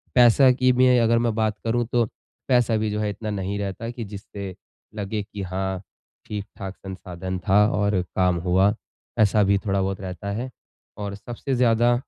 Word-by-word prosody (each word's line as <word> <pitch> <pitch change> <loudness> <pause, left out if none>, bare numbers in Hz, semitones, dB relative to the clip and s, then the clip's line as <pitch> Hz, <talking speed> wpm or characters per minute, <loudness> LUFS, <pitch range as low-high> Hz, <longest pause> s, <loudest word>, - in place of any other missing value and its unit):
पैसा 125 +2 +7
की 130 0 +3
भी 130 +1 +4
अगर 115 0 +4
मैं 115 -2 +1
बात 110 -2 0
करूँ 120 +1 +1
तो 120 -2 +3 0.4
पैसा 120 -3 +3
भी 110 0 0
जो 105 - -2
है 105 -1 0
इतना 105 +1 -5
नहीं 100 0 -2
रहता 100 +4 -4
कि 120 -1 -5
जिससे 100 -1 -8 0.4
लगे 105 +1 -2
कि 100 -1 -8
हाँ, 95 0 -3 0.4
ठीक-ठाक 100 -2 -6
संसाधन 95 -1 -6
था 105 +2 +6
और 100 -2 +1
काम 90 -1 +3
हुआ, 95 +3 +3 0.5
ऐसा 105 0 +5
भी 100 0 +3
थोड़ा-बहुत 95 -1 0
रहता 95 +2 -5
है। 120 +5 -3 0.5
और 100 -1 -4
सबसे 120 +5 -4
ज़्यादा 120 0 +4
105 Hz, 170 wpm, -24 LUFS, 95-115 Hz, 0.5 s, पैसा